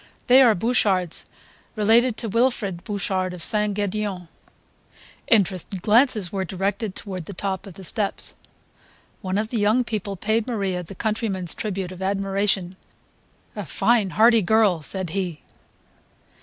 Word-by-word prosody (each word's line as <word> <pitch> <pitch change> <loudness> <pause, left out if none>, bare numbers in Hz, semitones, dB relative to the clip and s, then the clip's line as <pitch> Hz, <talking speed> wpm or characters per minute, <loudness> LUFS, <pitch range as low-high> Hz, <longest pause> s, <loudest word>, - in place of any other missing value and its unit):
They 255 +2 +7
are 235 -5 +6
Bouchards, 190 -5 +1 0.5
related 225 +2 +3
to 230 - -3
Wilfrid 215 -5 0
Bouchard 190 -3 -2
of 175 - -6
St. 210 -1 +2
Gedeon 200 -3 -3 0.5
..." - - -27
Interested 190 -1 -2
glances 220 -4 +3
were 195 -1 -2
directed 195 +2 -3
toward 185 -4 -6
the 200 - -8
top 195 +1 -3
of 185 - -11
the 190 - -11
steps. 200 +2 0 0.9
One 185 +1 -2
of 215 +1 -1
the 230 - -2
young 215 +5 +3
people 210 -4 -4
paid 220 +4 -1
Maria 195 -7 -2
the 180 +3 -10
countryman's 210 -5 0
tribute 195 -3 -4
of 185 0 -10
admiration 195 -1 0 0.8
"A - - -4
fine 230 -5 +1
hearty 230 +1 +6
girl!" 205 -3 +3
said 185 +2 -2
he. 180 -4 -4
200 Hz, 140 wpm, -23 LUFS, 185-220 Hz, 0.9 s, They